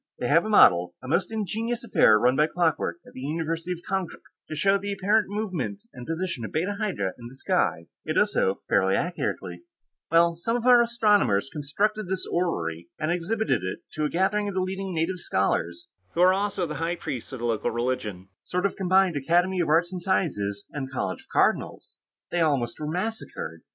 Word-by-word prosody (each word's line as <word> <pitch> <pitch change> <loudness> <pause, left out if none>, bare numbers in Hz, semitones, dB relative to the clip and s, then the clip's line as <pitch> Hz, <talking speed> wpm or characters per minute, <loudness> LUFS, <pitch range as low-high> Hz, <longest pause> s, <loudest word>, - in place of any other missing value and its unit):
They 125 - -2
have 165 +7 +4
a - - -3
model, 90 - +5
a - - -8
most 160 +9 0
ingenious 225 +2 -2
affair 210 - +5
run 125 +4 +3
by 150 +2 +3
clockwork, 165 0 0
at - - -15
the - - -9
University 165 +4 -3
of 175 - -10
Konkrook, 190 -3 -3 0.3
to 155 - -4
show 195 +6 +3
the 200 +1 -4
apparent 205 +2 +2
movement 205 -1 -3
and 125 -1 -9
position 165 -6 -3
of 110 - -5
Beta 190 +6 -1
Hydrae 180 - -1
in 120 - -8
the 125 - -12
sky; 85 -9 0 0.2
it - - -2
does - - +2
so 95 - +1
fairly 95 0 +3
accurately. 175 - -3 0.5
"Well, 170 0 +4
some 230 +8 -2
of 240 -1 -2
our 245 -1 +7
astronomers 210 - +2
constructed 205 +8 -1
this 190 0 -2
orrery, 85 - -2
and 155 +2 0
exhibited 200 - 0
it 95 - -4
to 155 -1 -2
a - - 0
gathering 200 +4 +1
of 200 - -4
the 190 - +1
leading 190 +1 -3
native 170 +3 -1
scholars, 85 - -1 0.3
who 170 - +2
are 185 +1 +7
also 195 -1 -1
the 150 - -5
high 170 +1 0
priests 145 -8 -5
of 130 - -5
the 120 - -4
local 115 -2 0
religion. 110 -6 -3
Sort 180 +2 -2
of 200 - 0
combined 190 -2 +3
Academy 175 +6 +2
of 170 - +1
Arts 170 +3 +2
and 180 - -4
Sciences 105 - -1
and 135 -3 -5
College 95 -8 -3
of - - -24
Cardinals. - - 0 0.3
They 175 - +1
almost 140 -7 0
were 150 -1 -3
massacred. 180 - -4
170 Hz, 200 wpm, -26 LUFS, 130-195 Hz, 0.5 s, our